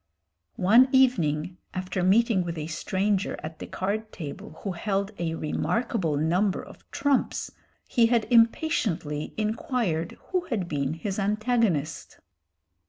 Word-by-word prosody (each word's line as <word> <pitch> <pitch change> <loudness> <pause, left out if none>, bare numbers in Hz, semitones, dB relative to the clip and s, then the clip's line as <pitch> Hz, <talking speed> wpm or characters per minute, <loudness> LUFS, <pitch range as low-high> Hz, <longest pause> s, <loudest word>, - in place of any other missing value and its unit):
One 230 +8 +6
evening, 180 - +2 0.2
after 185 0 -2
meeting 200 +1 +3
with 170 -1 -4
a 150 - -3
stranger 190 +4 -1
at 155 0 -7
the - - -6
card 215 +3 -3
table 155 -1 -8
who 195 - -2
held 195 +3 -1
a 165 -1 -1
remarkable 165 - -1
number 180 +6 +1
of - - -15
trumps, 285 -2 0 0.4
he 235 -2 +4
had 230 -2 +2
impatiently 225 - +2
inquired 215 - -1
who 365 -2 0
had 210 - -2
been 145 -1 -1
his 195 +4 -3
antagonist. 210 - 0
195 Hz, 125 wpm, -26 LUFS, 165-230 Hz, 0.4 s, One